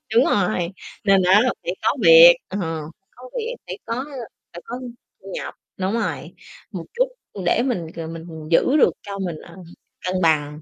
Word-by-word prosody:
đúng 240 - +6
rồi, 180 -3 +1 0.3
nên 195 -2 +4
á 190 +4 +6
là 255 +1 +1
phải 175 +2 -3
có 220 - +1
việc, 165 +1 +10
ờ, 195 - -5 0.6
có 255 0 -12
việc, 475 +2 -3
phải - - -5
có 240 +4 -3 0.5
phải 175 - -9
có 245 +2 -6 0.4
thu 195 - -15
nhập - - -5 0.2
đúng 190 +2 -1
rồi, 230 - -3 0.4
một - - -6
chút - - +2 0.4
để 175 - +3
mình, 185 -11 -2
ờ, 165 -1 -5
mình 165 0 -8 0.3
giữ 260 - +4
được - - +5
cho 200 -1 -7
mình, 180 -4 -3
ờ, 170 - -14 0.5
cân 185 0 -1
bằng, 150 -2 +1
190 Hz, 180 wpm, -22 LUFS, 170-235 Hz, 0.6 s, việc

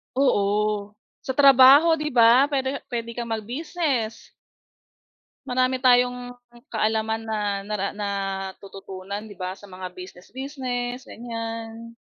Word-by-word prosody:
Oo, 210 -4 +1 0.3
sa 265 - -2
trabaho 280 +4 +7
'di 300 -3 -3
ba, 240 +3 +6
puwede 275 -1 -1
puwede 235 -1 -4
kang 235 -1 -3
mag-business. 245 - -3 1.2
Marami 255 0 +1
tayong 245 0 +3 0.4
kaalaman 220 0 0
na 220 -1 -2 0.3
nara 205 -2 -2
natututunan 195 0 -5
'di 205 - -12
ba 185 0 -4
sa 205 - -13
mga 185 -1 -8
business 180 0 -12
business, 255 -1 -4
ganyan. 230 -1 -7
230 Hz, 110 wpm, -24 LUFS, 205-255 Hz, 1.2 s, trabaho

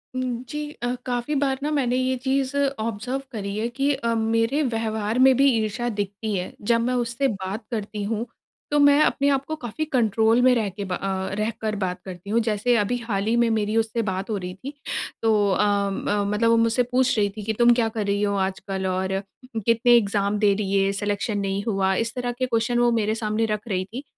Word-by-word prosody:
हुँ, 250 -1 -2
जी 300 0 -4
अ, 245 +1 0
काफ़ी 245 +4 -2
बार 265 -1 0
ना 295 - 0
मैंने 255 -4 +1
ये 255 0 +1
चीज़ 270 0 0 0.2
ऑब्जर्व 230 +5 -3
करी 200 -3 -4
है 225 +2 0
कि 275 +4 0
अ, 235 -3 -1
मेरे 225 +5 +1
व्यवहार 225 -2 -1
में 260 0 +6
भी 275 0 +5
ईर्षा 220 +2 -1
दिखती 205 +1 -4
है। 180 -1 -4
जब 230 +2 +2
मैं 250 +2 0
उससे 245 +3 0
बात 195 +1 -4
करती 210 -2 -3
हूँ 225 +2 -2 0.5
तो 295 - +3
मैं 285 0 +6
अपने 280 0 +1
आप 275 -1 +1
को 315 - -3
काफ़ी 280 +2 -4
कंट्रोल 225 -4 +2
में 255 0 +6
रहके 200 -3 -2
ब 185 - -3
अ, 190 0 -2
रहकर 215 0 -2
बात 180 -1 -2
करती 185 +1 -9
हूँ। 230 +3 +3
जैसे 220 +2 +1
अभी 210 +4 0
हाल 215 -4 -2
ही 230 - +2
में 235 -1 +3
मेरी 215 -1 0
उससे 225 +1 0
बात 190 0 -3
हो 215 - -1
रही 180 -1 -5
थी, 260 +10 -8 0.5
तो 210 -3 +3
अ, 190 - +2 0.3
म 205 +1 -1
मतलब 230 +2 +2
वो 230 - +5
मुझसे 230 +2 +3
पूछ 255 -1 +2
रही 205 -1 +2
थी 210 - -5
कि 220 - -1
तुम 240 0 +7
क्या 235 -2 +2
कर 220 -2 -3
रही 200 0 0
हो 200 0 +1
आजकल 190 0 -2
और 185 +1 -1 0.6
कितने 230 +1 +3
एक्जाम 205 -2 +1
दे 205 -2 +4
दिए, 195 -1 +1
सिलेक्शन 205 +1 -2
नहीं 195 0 -2
हुआ। 195 -2 +1
इस 230 +2 -1
तरह 245 -1 -2
के 255 +1 -2
क्वेश्चन 235 0 0
वो 240 0 +4
मेरे 220 -1 +1
सामने 220 0 0
रख 215 +1 -3
रही 185 -3 -1
थी। 235 +8 -8
225 Hz, 215 wpm, -24 LUFS, 205-245 Hz, 0.6 s, तुम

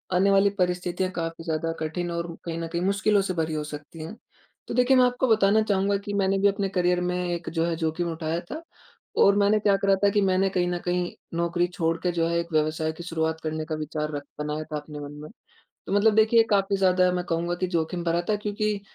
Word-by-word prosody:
आने 195 +2 +4
वाली 195 +1 +5
परिस्थितियाँ 180 +1 0
काफ़ी 165 -2 -4
ज़्यादा 165 0 -1
कठिन 170 +3 -3
और 170 0 -4
कहीं 165 -1 -4
न 165 - -3
कहीं 170 +1 -3
मुश्किलों 200 +2 +2
से 190 -1 -2
भरी 160 -2 -1
हो 150 - -2
सकती 150 +1 -8
हैं। 170 +7 -7 0.5
तो - - -4
देखिए 250 +2 +4
मैं 255 - +6
आपको 250 +1 +1
बताना 215 -1 +4
चाहूँगा 200 -1 +1
कि 205 - -4
मैंने 195 -1 +1
भी 200 - +4
अपने 200 -1 0
करियर 180 -1 +1
में 180 0 -1 0.2
एक 170 -1 -4
जो 165 0 0
है 170 - -1
जोखिम 165 +1 -2
उठाया 165 0 -2
था। 315 - -5 0.6
और 200 0 +6
मैंने 205 +1 +3
क्या 200 -1 +3
करा 195 0 +2
था 200 - +6
कि 205 +1 +2
मैंने 190 0 +2
कहीं 180 -1 0
न 175 - -1
कहीं 180 0 0 0.3
नौकरी 170 +1 +1
छोड़ 165 -2 -1
के 180 - +1
जो 165 -1 0
है 170 0 0
एक 170 - -3
व्यवसाय 155 +1 +1
की 175 - -7
शुरुआत 160 -1 -2
करने 155 0 -3
का 155 - -3
विचार 155 0 -3
रख 145 - -4 0.2
बनाया 150 +1 -3
था 150 - -1
अपने 150 0 -9
मन 145 0 -7
में। 155 - -9 0.6
तो - - -2
मतलब 210 +1 +4
देखिए 220 +1 +5
काफ़ी 200 -1 +2
ज़्यादा 185 -1 +3
मैं 180 0 -1
कहूँगा 170 +1 -1
कि 185 - +1
जोखिम 165 +2 -1
भरा 170 0 +1
था 215 - +3
क्योंकि 210 0 -2
175 Hz, 235 wpm, -25 LUFS, 165-200 Hz, 0.6 s, मैं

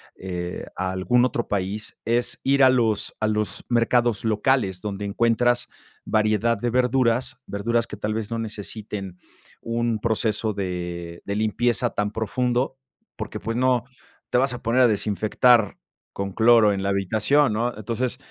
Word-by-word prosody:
eh, 90 -1 -5
a 95 0 -1
algún 120 +7 +2
otro 120 -2 -2
país, 100 +1 -3
es 120 +1 0
ir 140 0 +4
a 130 - +8
los 115 -5 +1
a 110 - +1
los 105 -1 -2
mercados 120 -2 +2
locales 110 -3 +1
donde 105 0 -5
encuentras 120 +4 +1 0.4
variedad 110 +2 +2
de 120 +4 -1
verduras, 125 +1 +1
verduras 115 +3 -1
que 105 - -8
tal 105 +1 -2
vez 110 0 -4
no 115 - -2
necesiten 105 -3 -6 0.4
un 115 -1 -1
proceso 110 -1 0
de 90 -3 -5
de 100 - -3
limpieza 110 +1 +1
tan 105 0 -2
profundo, 125 +4 -1 0.4
porque, 110 -2 -6
pues 115 +2 -3
no 125 -1 +2 0.5
te - - +2
vas 130 0 +2
a 120 - -7
poner 115 +2 +1
a - - +7
desinfectar 110 +1 +2 0.4
con 100 -1 -4
cloro 110 -1 +5
en 95 -1 -3
la 100 - 0
habitación, 110 +7 +2
¿no? 120 +3 0
Entonces, 115 +4 -2
110 Hz, 155 wpm, -24 LUFS, 100-120 Hz, 0.5 s, a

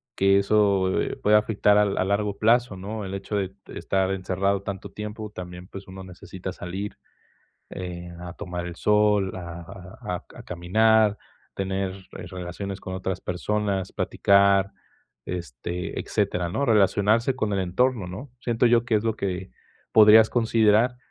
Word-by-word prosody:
que 100 0 +4
eso, 100 -2 +2
eh, - - -3
puede 105 +1 +4
afectar 105 -1 +3
a - - +6
a 100 -2 0
largo 100 0 0
plazo, 115 -1 +3
¿no? 105 +2 -5
El 95 - -6
hecho 100 +2 -4
de 95 -2 -1 0.2
estar 95 -1 0
encerrado 95 +1 -1
tanto 100 -1 -6
tiempo, 105 0 -6
también, 90 -1 -9
pues, 100 -1 -10
uno 95 0 -9
necesita 95 +1 -8
salir, 95 +4 -6 0.7
eh, 90 -1 -6
a 90 -1 -7
tomar 90 -3 -5
el 85 -1 -7
sol, 105 -2 +2
a 85 -1 -7
a 95 0 -8
a - - -10
ca - - -16
a - - -9
caminar, 105 +4 +3 0.4
tener 95 0 -2 0.2
re - - -8
relaciones 95 +2 -6
con 95 - -6
otras 95 0 -3
personas, 100 +1 -2
platicar, 100 0 +3 0.6
este, 85 0 -5
etcétera, 90 -1 -1
¿no? 140 +11 -1
Relacionarse 110 +2 +3
con 110 -5 -1
el 100 - 0
entorno, 100 +3 0
¿no? 100 +10 -8
Siento 120 0 +1
yo 120 0 +4
que 115 - 0
es 105 +1 +1
lo 110 -1 0
que 95 -1 -3 0.4
podrías 110 0 +8
considerar 115 +1 +3
100 Hz, 160 wpm, -25 LUFS, 95-105 Hz, 0.7 s, podrías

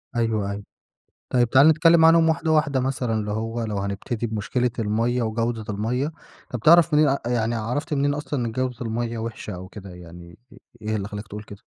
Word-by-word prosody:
أيوه، 110 -4 0
أيوه. 100 0 -6 0.7
طيب، 120 -2 +2
تعالَ 135 +5 +7
نتكلم 160 +1 +5
عنهم 165 0 +6
واحدة 160 0 0
واحدة 150 -4 +2
مثلًا، 125 -3 -1
اللي 105 -1 -2
هو 115 +2 -3
لو 105 -2 -3
هنبتدي 100 +4 -3
بمشكلة 115 +3 -1
المَيّة 115 +3 0
وجودة 115 0 -2
المَيّة، 120 +8 -2 0.4
طب، 125 - -3
بتعرف 170 +6 +5
منين 150 -2 +4
يعني 120 -1 0
عرفت 125 +8 -2
منين 145 0 +1
أصلًا 145 -4 -3
إن 115 - -4
جودة 130 +1 -2
المَيّة 115 0 -3
وحشة 110 -2 -6
أو 90 +1 -8
كده 100 -1 -10
يعني؟ 85 -1 -12 0.4
إيه 110 0 -1
اللي 100 -1 -4
خلاك 105 +1 -7
تقول 105 +1 -7
كده؟ 100 -1 -12
115 Hz, 185 wpm, -23 LUFS, 105-135 Hz, 0.7 s, تعالَ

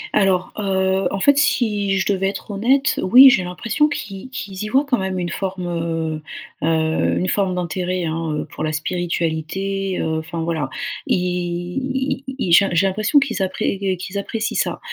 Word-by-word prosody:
Alors, 190 -3 +2
heu, 190 -1 +1
en 195 - -3
fait, 285 +7 +4
si 210 -8 +1
je 190 - 0
devais 195 0 0
être 205 - -7
honnête, 265 +8 +2
oui, 255 +7 +9
j'ai 185 - +2
l'impression 225 - 0
qu'ils 210 -4 -6
qu'ils 195 -6 -6
y 210 - -3
voient 270 +5 +3
quand 245 -6 +1
même 190 -1 -2
une 175 -1 -2
forme, 190 -2 -3
heu 165 -2 -2 0.4
heu 160 0 +1
une 185 - 0
forme 190 -3 0
d'intérêt, 180 0 -2
hein 160 0 -2
heu, - - -3
pour - - -5
la 155 0 -1
spiritualité, 175 +3 -2
heu 160 0 -1
enfin, 165 +1 -5
voilà. 160 -5 -2 0.4
Ils - - +3
i 180 +11 -2
ils 185 - -1
j'ai 195 +4 +6
j'ai 180 +4 +3
l'impression 215 +9 +1
qu'ils 270 -6 +2
appré 190 +1 -1
qu 190 -2 -1
qu'ils 185 +3 -5
apprécient 220 +2 -3
ça. - - -1
190 Hz, 180 wpm, -20 LUFS, 175-210 Hz, 0.4 s, oui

